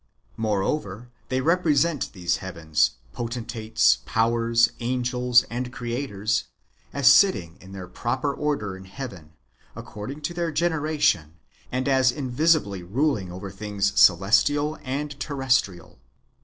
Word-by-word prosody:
Moreover, 110 Hz, +1 st, -2 dB, 0.2 s
they 130 Hz, 0 st, 0 dB
represent 165 Hz, -1 st, +1 dB
these 90 Hz, -3 st, -1 dB
heavens, 80 Hz, -9 st, 0 dB, 0.2 s
poten 120 Hz, 0 st, -4 dB
tates, 110 Hz, -1 st, +2 dB
powers, 115 Hz, +1 st, +2 dB
angels, 125 Hz, 0 st, +2 dB
and 125 Hz, +1 st, -5 dB
creators, 120 Hz, -4 st, -2 dB, 0.5 s
as 140 Hz, -2 st, +1 dB
sitting 95 Hz, -, +3 dB
in 95 Hz, -, -13 dB
their 95 Hz, -2 st, -8 dB
proper 130 Hz, +9 st, -2 dB
order 140 Hz, -11 st, -2 dB
in 95 Hz, 0 st, -12 dB
heaven, 95 Hz, -, -9 dB, 0.4 s
according 130 Hz, +8 st, -8 dB
to 150 Hz, +4 st, -3 dB
their 170 Hz, -1 st, -2 dB
generation, 150 Hz, -, 0 dB, 0.4 s
and 130 Hz, +2 st, -2 dB
as 130 Hz, -2 st, +4 dB
in 130 Hz, -1 st, -5 dB
visibly 140 Hz, -, +2 dB
ruling 105 Hz, -, -1 dB
over 95 Hz, +2 st, -7 dB
things 100 Hz, 0 st, -2 dB
celestial 145 Hz, +10 st, +3 dB
and 145 Hz, +2 st, -4 dB
terrestrial. 125 Hz, -, -1 dB
120 Hz, 120 wpm, -24 LUFS, 100-140 Hz, 0.5 s, as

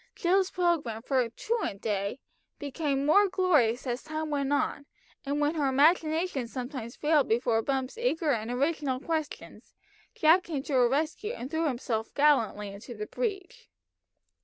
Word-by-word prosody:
Jill's 375 Hz, +1 st, +2 dB
programme 315 Hz, -, 0 dB
for 255 Hz, -3 st, +1 dB
"truant 430 Hz, -, -3 dB
day" 200 Hz, 0 st, -2 dB, 0.4 s
grew 285 Hz, 0 st, -2 dB
more 310 Hz, +9 st, +4 dB
glorious 300 Hz, -, +2 dB
as 245 Hz, 0 st, -2 dB
time 310 Hz, 0 st, -4 dB
went 280 Hz, -1 st, -1 dB
on, 285 Hz, 0 st, -1 dB, 0.4 s
and 285 Hz, +1 st, 0 dB
when 295 Hz, +1 st, +1 dB
her 300 Hz, -4 st, 0 dB
imagination 310 Hz, 0 st, +2 dB
sometimes 245 Hz, -1 st, -6 dB
failed 300 Hz, -2 st, +2 dB
before 230 Hz, 0 st, +1 dB
Bumps' 265 Hz, -, -2 dB
eager 325 Hz, -10 st, +1 dB
and 225 Hz, -3 st, -2 dB
original 275 Hz, +1 st, -1 dB
questions, 315 Hz, 0 st, -5 dB, 0.4 s
Jack 320 Hz, +4 st, +5 dB
came 290 Hz, -5 st, -3 dB
to 285 Hz, -, -5 dB
her 250 Hz, -2 st, +4 dB
rescue 315 Hz, -, -1 dB
and 260 Hz, -, -7 dB
threw 320 Hz, 0 st, 0 dB
himself 235 Hz, -4 st, -3 dB
gallantly 235 Hz, -8 st, +2 dB
into 205 Hz, +5 st, -9 dB
the 210 Hz, 0 st, -5 dB
breach. 390 Hz, -, -5 dB
285 Hz, 150 wpm, -28 LUFS, 245-320 Hz, 0.4 s, Jack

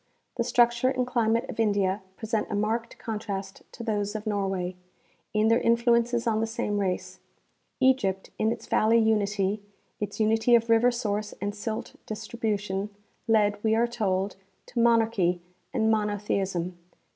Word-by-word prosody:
The 235 Hz, -, +2 dB
structure 240 Hz, +1 st, +3 dB
and 255 Hz, -1 st, 0 dB
climate 230 Hz, -2 st, +1 dB
of 230 Hz, -, -8 dB
India 200 Hz, -2 st, +1 dB, 0.2 s
present 220 Hz, -1 st, -1 dB
a -, -, -2 dB
marked 225 Hz, +3 st, -1 dB
contrast 200 Hz, -3 st, -5 dB
to 235 Hz, -, -7 dB
those 205 Hz, -2 st, -1 dB
of 215 Hz, 0 st, -4 dB
Nor 205 Hz, -2 st, 0 dB
way, 185 Hz, -1 st, -3 dB, 0.6 s
in 215 Hz, 0 st, +2 dB
their 230 Hz, +2 st, +4 dB
influences 235 Hz, 0 st, +2 dB
on 220 Hz, -2 st, +1 dB
the 225 Hz, -, 0 dB
same 210 Hz, -2 st, -2 dB
race. 185 Hz, -2 st, -2 dB, 0.6 s
Egypt 240 Hz, -8 st, +2 dB
in 220 Hz, +1 st, +2 dB
its -, -, -5 dB
valley 225 Hz, +2 st, +3 dB
unity, 210 Hz, -2 st, +1 dB, 0.4 s
its 205 Hz, 0 st, -4 dB
unity 225 Hz, +2 st, +4 dB
of 230 Hz, 0 st, +2 dB
river 230 Hz, +2 st, +5 dB
source 215 Hz, -3 st, -2 dB
and 205 Hz, +1 st, -2 dB
silt 215 Hz, +1 st, -5 dB
distribution, 210 Hz, -3 st, -3 dB, 0.4 s
led, 205 Hz, -2 st, +2 dB
we 220 Hz, 0 st, +3 dB
are 230 Hz, +1 st, +3 dB
told, 200 Hz, -5 st, -1 dB, 0.3 s
to 240 Hz, -, -4 dB
monarchy 225 Hz, -6 st, +3 dB, 0.3 s
and 220 Hz, -3 st, +2 dB
monotheism. 195 Hz, -4 st, -1 dB
220 Hz, 150 wpm, -27 LUFS, 205-230 Hz, 0.6 s, river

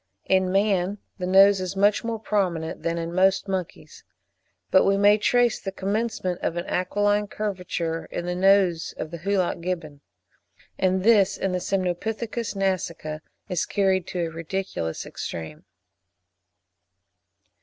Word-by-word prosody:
In 190 Hz, -1 st, +2 dB
man 195 Hz, -1 st, +1 dB, 0.2 s
the 180 Hz, -, -2 dB
nose 195 Hz, +1 st, +6 dB
is 185 Hz, +1 st, -4 dB
much 200 Hz, +1 st, +3 dB
more 230 Hz, -1 st, -2 dB
prominent 185 Hz, -7 st, -1 dB
than 170 Hz, 0 st, -1 dB
in 165 Hz, 0 st, -4 dB
most 190 Hz, +2 st, +3 dB
monkeys; 190 Hz, -3 st, -5 dB, 0.7 s
but 190 Hz, -, +6 dB
we 195 Hz, 0 st, +3 dB
may 205 Hz, +1 st, +5 dB
trace 245 Hz, +1 st, +2 dB
the 195 Hz, -, -4 dB
commencement 195 Hz, -2 st, -2 dB
of 170 Hz, -, -2 dB
an 175 Hz, -, -2 dB
aquiline 205 Hz, +3 st, +1 dB
curvature 180 Hz, -6 st, -3 dB
in 175 Hz, -, -5 dB
the 180 Hz, -, -2 dB
nose 185 Hz, -2 st, +3 dB
of 155 Hz, -, -5 dB
the 170 Hz, -, -6 dB
Hoolock 185 Hz, -1 st, 0 dB
Gibbon; 165 Hz, -5 st, -4 dB, 0.8 s
and 185 Hz, 0 st, +1 dB
this 210 Hz, -3 st, +4 dB
in 195 Hz, -, -1 dB
the 180 Hz, -, -1 dB
Semnopithecus 210 Hz, +6 st, -2 dB
nasica 170 Hz, -5 st, -2 dB, 0.3 s
is 180 Hz, -3 st, -1 dB
carried 190 Hz, -3 st, +1 dB
to 180 Hz, -, -3 dB
a 165 Hz, -, -5 dB
ridiculous 165 Hz, -, -4 dB
extreme. 80 Hz, -2 st, -7 dB
190 Hz, 140 wpm, -25 LUFS, 175-200 Hz, 0.8 s, nose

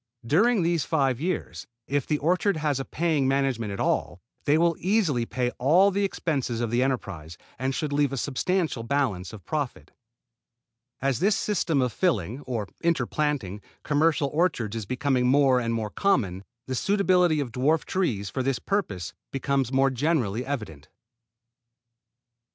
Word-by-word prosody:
During 200 Hz, -, +3 dB
these 170 Hz, -3 st, +1 dB
five 135 Hz, -5 st, 0 dB
years, 180 Hz, +3 st, -3 dB, 0.2 s
if 145 Hz, -1 st, -1 dB
the 150 Hz, -, +1 dB
orchard 180 Hz, +5 st, +1 dB
has 150 Hz, -3 st, 0 dB
a 135 Hz, -, -3 dB
paying 155 Hz, -5 st, 0 dB
management 135 Hz, -5 st, 0 dB
at 100 Hz, -, -5 dB
all, 85 Hz, -, 0 dB, 0.3 s
they 145 Hz, +2 st, +4 dB
will 170 Hz, 0 st, +3 dB
easily 175 Hz, -, +1 dB
pay 125 Hz, +1 st, -1 dB
all 175 Hz, +10 st, +5 dB
the 200 Hz, +1 st, 0 dB
expenses 140 Hz, -11 st, -1 dB
of 120 Hz, -2 st, -1 dB
the 120 Hz, +1 st, +2 dB
enterprise, 100 Hz, -, -3 dB, 0.2 s
and 130 Hz, +1 st, -1 dB
should 150 Hz, -3 st, -2 dB
leave 145 Hz, -2 st, +2 dB
a 135 Hz, -, -3 dB
substantial 155 Hz, +2 st, -1 dB
balance 115 Hz, -7 st, -1 dB
of 110 Hz, -3 st, -11 dB
profit. 145 Hz, -5 st, -4 dB, 1.1 s
As 135 Hz, -3 st, +1 dB
this 200 Hz, +4 st, +3 dB
system 165 Hz, -9 st, +1 dB
of 125 Hz, -3 st, -1 dB
filling, 125 Hz, -, 0 dB
or 115 Hz, -5 st, -2 dB, 0.2 s
interplanting, 145 Hz, -, 0 dB, 0.2 s
commercial 150 Hz, -1 st, +2 dB
orchards 150 Hz, -, 0 dB
is 110 Hz, -3 st, -4 dB
becoming 130 Hz, 0 st, +1 dB
more 135 Hz, -1 st, +4 dB
and 115 Hz, -1 st, -1 dB
more 110 Hz, -2 st, -2 dB
common, 100 Hz, -, 0 dB, 0.2 s
the 130 Hz, -, -4 dB
suitability 180 Hz, 0 st, +2 dB
of 135 Hz, -4 st, -3 dB
dwarf 145 Hz, +7 st, +1 dB
trees, 120 Hz, -, -1 dB
for 130 Hz, -, -2 dB
this 135 Hz, -1 st, 0 dB
purpose, 115 Hz, -, -2 dB, 0.2 s
becomes 135 Hz, -1 st, -1 dB
more 135 Hz, 0 st, +3 dB
generally 125 Hz, -5 st, 0 dB
evident. 105 Hz, -, -6 dB
135 Hz, 155 wpm, -26 LUFS, 120-160 Hz, 1.1 s, all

